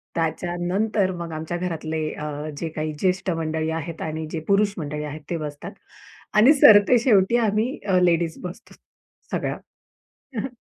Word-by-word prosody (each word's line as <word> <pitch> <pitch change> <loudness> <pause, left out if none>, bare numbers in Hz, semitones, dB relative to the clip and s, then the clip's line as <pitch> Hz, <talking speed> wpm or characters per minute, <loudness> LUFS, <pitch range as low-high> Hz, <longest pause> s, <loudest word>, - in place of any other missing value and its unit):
त्याच्यानंतर 175 +5 0
मग 170 -1 -6
आमच्या 160 +2 -4
घरातले 160 -3 -3
अ, 150 0 -5
जे 165 - -3
काही 155 0 -4
ज्येष्ठ 185 +2 0
मंडळी 160 -1 -2
आहेत 165 +1 -7
आणि 160 0 -3
जे 160 - -3
पुरुष 200 0 +3
मंडळी 150 -2 -4
आहेत, 150 +1 -6
ते 170 - -1
बसतात 150 -2 -6 0.6
आणि 225 +8 +7
सरतेशेवटी 225 -3 +6
आम्ही 220 +2 0
अ, 185 -1 +4
लेडीज 170 -2 +2
बसतो 180 +6 -9 0.6
सगळ्या. - - -2 0.8
हं, 220 - 0
हं. - - -3
175 Hz, 145 wpm, -23 LUFS, 155-200 Hz, 0.8 s, आणि